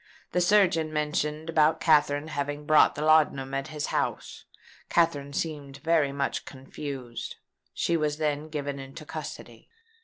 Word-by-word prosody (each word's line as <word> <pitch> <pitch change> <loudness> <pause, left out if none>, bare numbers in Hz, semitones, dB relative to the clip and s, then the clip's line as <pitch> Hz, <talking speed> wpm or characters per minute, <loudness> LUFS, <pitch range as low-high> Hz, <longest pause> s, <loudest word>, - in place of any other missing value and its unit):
The 180 - +1
surgeon 175 -4 +3
mentioned 150 +1 -1
about 160 -1 +3
Katherine 150 -1 +3
having 145 0 -3
bought 155 0 +5
the 150 - -3
laudanum 150 -4 +3
at 135 +1 -2
his 150 -1 -4
house. - - -2 0.4
Katherine 145 -5 +1
seemed 140 -2 -4
very 155 -1 +2
much 140 0 -2
confused. 135 -2 -7 0.4
She 170 - 0
was 150 -2 0
then 150 0 -1
given 145 -2 -4
into 135 +4 -9
custody." - - -8
150 Hz, 140 wpm, -27 LUFS, 140-155 Hz, 0.4 s, bought